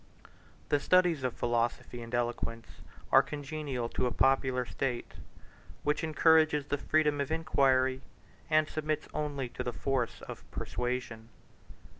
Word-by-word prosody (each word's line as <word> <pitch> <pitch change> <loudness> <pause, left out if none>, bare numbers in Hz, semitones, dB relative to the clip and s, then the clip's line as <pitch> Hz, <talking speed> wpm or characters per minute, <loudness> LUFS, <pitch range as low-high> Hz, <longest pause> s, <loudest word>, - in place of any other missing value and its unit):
The 145 - +3
studies 175 -3 +3
of 125 -2 -1
philosophy 120 0 -1
and 115 0 -8
eloquence 120 -1 -2 0.5
are 135 - +8
congenial 145 -3 -4
to 125 - 0
a - - -2
popular 130 0 +2
state, 125 -1 -3 0.7
which 150 +2 0
encourages 155 -2 +4
the 145 0 -2
freedom 150 -1 +2
of 140 - -2
inquiry, 130 -5 +2 0.5
and 155 -1 +4
submits 155 -1 -2
only 145 -4 -2
to - - -5
the 120 - -3
force 130 -2 -2
of - - -8
persuasion. 125 -2 -4
135 Hz, 130 wpm, -31 LUFS, 125-150 Hz, 0.7 s, are